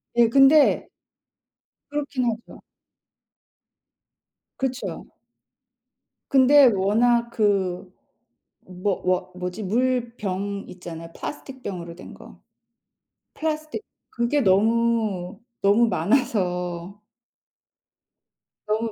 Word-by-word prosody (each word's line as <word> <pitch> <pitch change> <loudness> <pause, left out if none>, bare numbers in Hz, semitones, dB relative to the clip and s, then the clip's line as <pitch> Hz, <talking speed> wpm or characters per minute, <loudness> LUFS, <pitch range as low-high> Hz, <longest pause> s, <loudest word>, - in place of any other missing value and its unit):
예 235 -1 +5
근데 275 +4 +5 1.0
그렇긴 285 -3 -2
하죠. 225 +1 -10 2.0
그쵸. 260 -1 -3 1.3
근데 275 +1 +7
워낙 235 +5 +2
그 195 -4 0 0.7
뭐 185 +2 -3
뭐 185 0 0
뭐지 180 +3 -5
물병 210 -3 -1
있잖아요. 165 -2 -9
플라스틱 270 -3 -8
병으로 175 -4 -6
된 - - -11
거. - - -15 0.9
플라스틱 310 +3 -3 0.3
그게 240 +5 0
너무, 215 -2 +1 0.2
너무 210 +4 +4
많아서 180 - -1 1.7
너무 220 +1 -1
215 Hz, 155 characters per minute, -24 LUFS, 185-245 Hz, 2.0 s, 근데